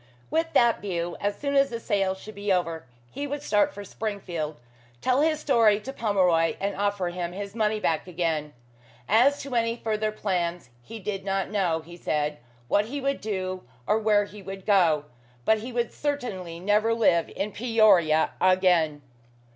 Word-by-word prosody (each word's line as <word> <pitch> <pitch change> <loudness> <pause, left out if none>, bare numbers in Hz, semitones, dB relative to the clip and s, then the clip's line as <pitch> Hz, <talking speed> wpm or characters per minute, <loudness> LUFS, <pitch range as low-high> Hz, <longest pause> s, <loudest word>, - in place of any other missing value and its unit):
With 325 +1 0
that 235 -1 +4
view, 175 -3 -3
as 205 0 -1
soon 280 -1 -2
as 275 0 +4
the 230 - -4
sale 195 -4 0
should 215 +3 -11
be 200 0 -2
over 165 -5 -1 0.2
he 285 +1 -4
would 290 +1 -4
start 215 +6 +2
for 205 - -8
Springfield, 185 -7 -4 0.4
tell 255 - +2
his 310 0 +2
story 230 -8 +4
to 265 +6 -7
Pomeroy, 185 -8 +2
and 200 +1 -2
offer 200 -3 0
him 175 0 -4
his 200 +1 -6
money 215 -1 0
back 165 -4 0
again. 160 -4 -2 0.6
As 255 +7 +4
to 275 -2 -7
any 230 -1 +1
further 215 -2 -1
plans, 175 -8 -2
he 225 - -9
did 195 -2 -4
not 195 0 -1
know, 180 -6 +1
he 170 +2 -12
said, 150 -3 -1 0.3
what 205 +10 +2
he 275 +6 -4
would 275 0 -1
do, 185 -3 -3 0.2
or 215 - +2
where 210 -1 +3
he 205 0 -12
would 195 0 -8
go; 170 -8 +3 0.4
but 220 0 +4
he 240 +4 -7
would 235 -1 -1
certainly 210 - -3
never 210 +4 +2
live 170 -7 +3
in 205 +2 -2
Peoria 200 -9 +4
again. 180 -5 +3
205 Hz, 175 wpm, -26 LUFS, 175-225 Hz, 0.6 s, that